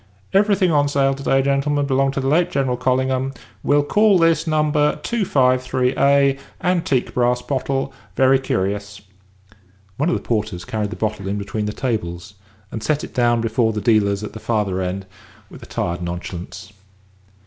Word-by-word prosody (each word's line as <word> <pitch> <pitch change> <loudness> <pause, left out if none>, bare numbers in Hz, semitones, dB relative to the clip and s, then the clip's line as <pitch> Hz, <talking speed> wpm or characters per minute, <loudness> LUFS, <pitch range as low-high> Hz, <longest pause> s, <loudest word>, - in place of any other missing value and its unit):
Everything 195 -2 +3
on 145 -2 +3
sale 140 -1 +2
to 135 - -8
day, 135 -1 +2
gentlemen, 140 +1 +1
belonged 135 0 +1
to - - 0
the 135 - -2
late 165 +5 +3
General 135 -2 0
Collingham. 130 +1 0 0.3
We'll 145 0 +3
call 210 +5 +4
this 165 -1 +2
No. 155 -1 +2
253_a_. 140 - +2 0.2
Antique 170 -8 0
brass 125 0 +1
bottle. 135 0 -2 0.2
Very 130 +2 +4
curious." 100 -3 -3 1.0
One 150 +5 +1
of - - +1
the - - -3
porters 105 -6 -2
carried 105 0 -2
the 110 - -6
bottle 105 -3 -3
in 100 +1 -2
between 105 +1 -3
the - - -2
tables, 95 -7 -4 0.4
and 110 - -5
set 150 +4 0
it - - -8
down 120 -1 +2
before 115 0 +1
the 105 - -2
dealers 105 -3 +2
at 105 - -6
the 110 - -8
farther 105 -5 -1
end 95 +1 -3 0.5
with - - -12
a - - -11
tired 85 0 -3
nonchalance. 90 +3 -6
130 Hz, 165 wpm, -20 LUFS, 105-140 Hz, 1.0 s, call